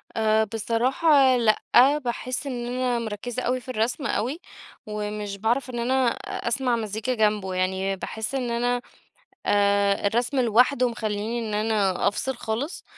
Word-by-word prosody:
آآ 220 -1 +3
بصراحة 255 +6 +3
لأ. 220 -3 +3 0.4
باحِس 255 0 -4
إن 245 -3 -4
أنا 245 -1 0
مركِّزة 230 +3 -4
أوي 255 +1 0
في 250 - -14
الرسم 240 +5 -1
أوي، 260 +9 -1 0.5
ومش 210 -1 -4
باعرف 240 +5 0
إن 240 -1 -4
أنا 255 +2 +2
أ 235 - -4
أسمع 250 0 +1
مزيكا 220 +2 -2
جنبه. 210 -4 +1
يعني 190 +1 0
باحِس 220 +6 -5
إن 250 -3 -2
أنا 245 +1 0 0.6
أ 200 0 +2
الرسم 240 +5 0
لوحده 250 +2 +3
مخلّيني 220 0 -3
إن 220 -2 -4
أنا 210 -4 +1
أفصل 260 +6 -1
خالص. 235 +9 -4
230 Hz, 145 wpm, -25 LUFS, 210-250 Hz, 0.6 s, آآ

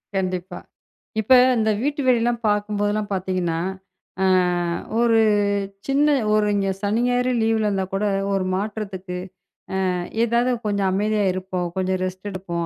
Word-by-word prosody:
கண்டிப்பா. 185 -1 -2 0.6
இப்ப 220 +5 +4 0.2
இந்த 220 -1 +2
வீட்டு 285 +2 -1
வேலை 250 -2 +4
எல்லாம் 240 -1 -1
பார்க்கும்போது 205 0 0
எல்லாம் 210 -1 -3
பார்த்தீங்கன்னா, 185 -3 -1 0.6
அ - - +4 0.7
ஒரு 230 -1 +4 0.7
சின்ன 280 +2 +3 0.3
ஒரு 215 0 +3
இங்க 195 -1 0
சனி, 210 +3 0
ஞாயிறு 250 +1 +1
லீவ்ல 220 -1 +2
இருந்தா 195 -2 0
கூட, 195 +2 0 0.3
ஒரு 195 -1 0
மாற்றத்துக்கு 195 -3 -4 0.7
அ - - -1 0.3
ஏதாவது 235 +2 +1 0.2
கொஞ்சம் 200 -2 +1
அமைதியா 210 +2 +1
இருப்போம். 185 -1 -3
கொஞ்சம் 185 0 0
ரெஸ்ட் 185 +2 -5
எடுப்போம் 175 -3 -4
205 Hz, 140 wpm, -22 LUFS, 185-220 Hz, 0.7 s, இப்ப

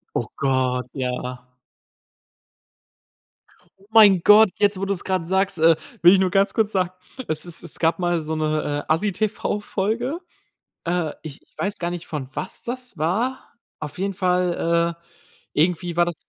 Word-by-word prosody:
Oh - - -1
Gott, 130 -2 0
ja. 125 -1 -4 2.3
Oh 195 - -22
mein 205 -5 +7
Gott, 210 0 +8
jetzt, 205 -2 +2
wo 195 - -1
du's 195 -2 -1
grad 185 -3 -1
sagst, 190 -2 +1
äh, 165 +1 +6 0.3
will 175 +2 +8
ich 195 - +4
nur 190 -1 +2
ganz 195 +1 +2
kurz 220 -1 +1
sagen, 185 -2 +1 0.4
es 155 +2 -3
ist 170 -1 -9
es - - -11
gab 165 +2 +2
mal 175 -1 +1
so 160 0 -4
'ne, 155 -1 -1
äh, - - -1
Assi-TV-Folge. 210 - -1 0.7
Äh, 170 -2 -1
ich 150 -4 -9
ich - - -33
weiß 205 +1 -2
gar 175 0 -2
nicht, 175 -1 -6
von 145 -5 -5
was 185 - -5
das 250 -5 -6
war. 220 - -1 0.3
Auf 150 +1 -7
jeden 195 +1 -2
Fall, 175 -2 +1
äh, 170 - -35 0.5
irgendwie 170 +2 0
war 175 - +5
das 175 - -3
175 Hz, 160 wpm, -23 LUFS, 160-200 Hz, 2.3 s, Gott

